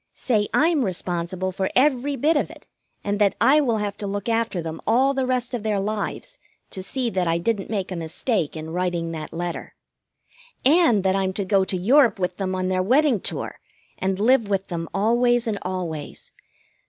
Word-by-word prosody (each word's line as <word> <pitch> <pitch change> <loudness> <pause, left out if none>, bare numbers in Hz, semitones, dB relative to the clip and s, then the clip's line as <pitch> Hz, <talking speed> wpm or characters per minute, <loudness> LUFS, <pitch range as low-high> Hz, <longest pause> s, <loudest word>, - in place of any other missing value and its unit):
Say 215 -5 0
I'm 315 -3 +3
responsible 185 -1 -2
for 190 +1 -2
every 280 +1 +2
bit 300 +6 +2
of 290 - 0
it, - - -14 0.4
and 205 0 -1
that 200 -2 +3
I 295 +3 +5
will 235 -6 +1
have 205 -1 -2
to 205 - -3
look 200 +1 -4
after 230 -4 0
them 160 -1 -5
all 260 +5 +3
the 265 -2 -1
rest 255 -1 -1
of 240 - -2
their 210 -2 0
lives 215 - -4 0.3
to 190 - -5
see 245 +5 -2
that 185 -2 0
I 165 0 +2
didn't 200 +3 -1
make 195 -3 -2
a - - -3
mistake 165 - -2
in 155 +1 -6
writing 175 -1 -1
that 155 -2 -6
letter. 175 +1 -5 0.9
And 285 - +5
that 190 0 +2
I'm 190 -1 0
to 200 0 -2
go 195 0 +3
to 190 - -1
Europe 235 +4 +4
with 180 -2 -2
them 185 -1 -2
on 185 0 -1
their 185 0 +1
wedding 255 +4 +3
tour - - -4 0.4
and 190 0 0
live 225 +1 +3
with 195 -1 -1
them 165 -2 -4
always 240 +4 +2
and 215 -3 -2
always. 175 -5 -5
200 Hz, 195 wpm, -23 LUFS, 185-245 Hz, 0.9 s, I